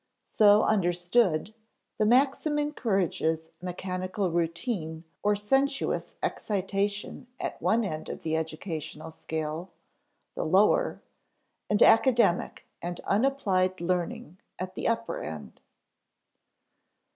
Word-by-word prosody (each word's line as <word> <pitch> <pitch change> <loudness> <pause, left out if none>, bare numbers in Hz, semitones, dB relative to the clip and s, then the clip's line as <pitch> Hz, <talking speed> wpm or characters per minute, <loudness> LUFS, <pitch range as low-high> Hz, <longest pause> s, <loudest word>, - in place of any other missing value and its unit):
So 210 0 +5
understood, 180 -1 +2 0.5
the 215 - +3
maxim 275 +5 +3
encourages 195 - 0
mechanical 185 +1 -3
routine 165 -1 -2 0.2
or 210 0 +2
sensuous 270 +7 0
excitation 200 +3 -2
at - - -4
one 230 +1 +2
end 155 -6 -4
of - - -7
the 160 -1 0
educational 160 -1 -5
scale 160 +2 -4 0.6
the - - -3
lower - - +3 0.7
and 210 - +5
academic 225 -5 +4 0.2
and 175 +1 -4
unapplied 195 -6 +1
learning 175 0 -2 0.2
at 185 +1 -5
the - - -3
upper 230 0 -1
end. 80 -2 -8
185 Hz, 100 wpm, -28 LUFS, 170-220 Hz, 0.7 s, So